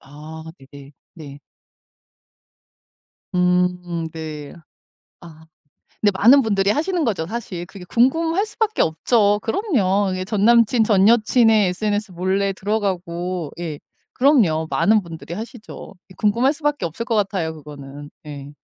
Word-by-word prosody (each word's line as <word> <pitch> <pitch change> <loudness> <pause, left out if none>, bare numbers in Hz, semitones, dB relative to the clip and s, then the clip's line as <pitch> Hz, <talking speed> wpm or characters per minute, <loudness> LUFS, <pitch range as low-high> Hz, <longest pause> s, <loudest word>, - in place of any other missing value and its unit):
아 155 +3 -11
네네. 140 +1 -14 0.2
네. 145 -4 -11 2.0
음 180 -2 0
네. 155 -3 -7 0.7
아. 160 -2 -14 0.6
근데 210 - +4
많은 260 +6 +7
분들이 200 -3 +1
하시는 330 - 0
거죠 190 - -1
사실. 190 -4 -6
그게 190 0 -12
궁금할 325 - +1
수밖에 435 0 -1
없죠. 205 +5 +2
그럼요. 205 - 0
예 185 - -3
전 205 0 -1
남친 235 0 +4
전 200 -2 +4
여친의 225 -2 +4
SNS 205 +2 -2
몰래 190 +3 0
들어가고 185 -5 -3
예. 160 -4 -5 0.4
그럼요. 215 - +3
많은 215 0 +3
분들이 165 -1 -9
하시죠. 220 0 -9 0.2
궁금할 235 +6 +2
수밖에 290 - -1
없을 170 +8 -5
것 235 - -2
같아요 190 -6 -1
그거는. 145 -1 -11 0.2
예. 145 -1 -8
195 Hz, 255 characters per minute, -21 LUFS, 165-225 Hz, 2.0 s, 많은